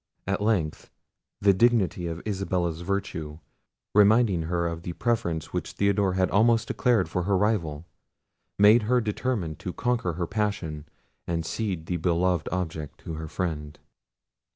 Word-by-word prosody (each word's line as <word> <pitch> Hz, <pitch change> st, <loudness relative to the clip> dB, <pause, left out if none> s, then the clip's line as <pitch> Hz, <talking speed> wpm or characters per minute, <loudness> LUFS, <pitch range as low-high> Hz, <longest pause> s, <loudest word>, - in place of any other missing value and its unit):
At 100 Hz, +2 st, -1 dB
length 100 Hz, -8 st, 0 dB, 0.5 s
the 100 Hz, -1 st, +5 dB
dignity 95 Hz, -5 st, +2 dB
of 85 Hz, 0 st, -5 dB
Isabella's 90 Hz, -5 st, -1 dB
virtue 85 Hz, -5 st, -3 dB, 0.6 s
reminding 105 Hz, -3 st, +5 dB
her 85 Hz, -1 st, 0 dB
of 85 Hz, -1 st, -3 dB
the 85 Hz, +1 st, -5 dB
preference 85 Hz, -8 st, -1 dB
which -, -, -3 dB
Theodore 100 Hz, -1 st, +2 dB
had 95 Hz, -1 st, +1 dB
almost 115 Hz, +2 st, +3 dB
declared 120 Hz, -7 st, +2 dB
for 90 Hz, -, -2 dB
her 100 Hz, -1 st, +2 dB
rival, 85 Hz, -7 st, 0 dB, 0.7 s
made 105 Hz, +4 st, +7 dB
her 125 Hz, 0 st, +4 dB
determine 105 Hz, -, -2 dB
to 90 Hz, -, -6 dB
conquer 115 Hz, -4 st, 0 dB
her 85 Hz, +2 st, -2 dB
passion, 95 Hz, -7 st, -3 dB, 0.4 s
and 85 Hz, -1 st, -1 dB
cede 95 Hz, -5 st, -3 dB
the 90 Hz, +1 st, -2 dB
beloved 85 Hz, 0 st, +1 dB
object 80 Hz, -5 st, -4 dB
to 80 Hz, -, -6 dB
her 80 Hz, 0 st, -5 dB
friend. 75 Hz, -3 st, -4 dB
90 Hz, 145 wpm, -26 LUFS, 85-105 Hz, 0.7 s, made